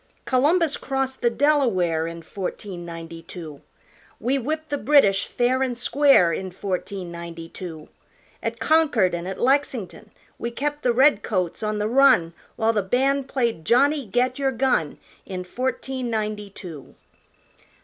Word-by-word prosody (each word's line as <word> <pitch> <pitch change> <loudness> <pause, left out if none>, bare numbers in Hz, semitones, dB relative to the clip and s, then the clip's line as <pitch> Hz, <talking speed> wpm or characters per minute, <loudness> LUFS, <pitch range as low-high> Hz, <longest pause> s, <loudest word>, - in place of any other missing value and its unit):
Columbus 300 +4 +2
crossed 270 -1 -3
the 240 - +3
Delaware 230 - +2
In 165 0 -7
fourteen 185 0 -6
ninety 165 0 -8
two; 160 -4 -9 0.6
We 270 +3 0
whipped 310 +5 -3
the 290 -1 -2
British, 210 -6 +4
fair 250 +2 +1
an' 255 -2 0
square, 245 - +4
In 190 +3 -4
fourteen 185 -1 -4
ninety 170 -1 -8
two. 165 -3 -8 0.5
At - - -3
Concord 285 - +3
an' 175 +1 -3
at 190 - -5
Lexington. 245 -6 0 0.3
We 235 - -2
kept 295 +4 -3
the 245 - +2
redcoats 215 - +2
on 215 -1 -1
the 210 0 0
run, 245 -9 +4 0.2
While 225 0 +1
the 210 - +1
band 265 +7 +1
played 235 - -1
Johnny 275 - +3
Get 250 +6 0
Your 270 -1 +1
Gun, 245 - 0 0.3
In 185 -1 -4
fourteen 255 +4 -3
ninety 210 -2 -3
two. 170 -7 -10
230 Hz, 145 wpm, -23 LUFS, 180-270 Hz, 0.6 s, British